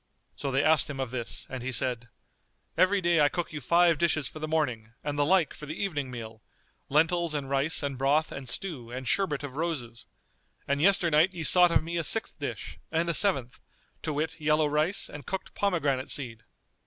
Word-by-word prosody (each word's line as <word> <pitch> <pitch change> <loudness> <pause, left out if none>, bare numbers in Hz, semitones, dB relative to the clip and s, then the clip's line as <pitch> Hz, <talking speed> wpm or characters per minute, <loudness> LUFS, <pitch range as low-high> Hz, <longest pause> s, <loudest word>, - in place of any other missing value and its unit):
So 140 - -4
they 135 +1 +1
asked 155 -2 +4
him 140 -2 -6
of 130 -3 -3
this 120 -2 -4
and 130 -2 -6
he 130 +2 -3
said, 120 -1 -2 0.7
"Every 190 +3 +3
day 170 -3 +3
I 145 - +5
cook 175 -1 -4
you 150 - -5
five 170 -1 +4
dishes 155 -5 +1
for 155 - -9
the 155 - -3
morning 125 -8 -1
and 145 -1 -3
the 145 - +2
like 170 +1 +3
for 150 - -10
the 155 - -6
evening 145 -9 -2
meal, 115 -3 -8 0.5
lentils 165 +2 +2
and 140 -2 -3
rice 140 +3 0
and 140 -2 -3
broth 145 +4 +2
and 135 -2 -7
stew[FN#240] 125 -4 -5
and 130 0 -6
sherbet 155 -8 0
of 140 -1 -7
roses; 125 -8 -4 0.6
and 140 +1 0
yesternight 175 -1 +3
ye 165 - -4
sought 180 +3 +6
of 170 - +2
me 170 +1 -4
a - - -1
sixth 225 +7 +1
dish - - -6
and 165 +1 0
a - - +1
seventh, 135 - +1 0.4
to - - -3
wit 155 +2 -3
yellow 155 0 +3
rice 150 +6 +2
and 145 -3 -10
cooked 190 - -5
pomegranate 145 -10 0
seed." 115 -5 -5
150 Hz, 205 wpm, -28 LUFS, 130-170 Hz, 0.7 s, sought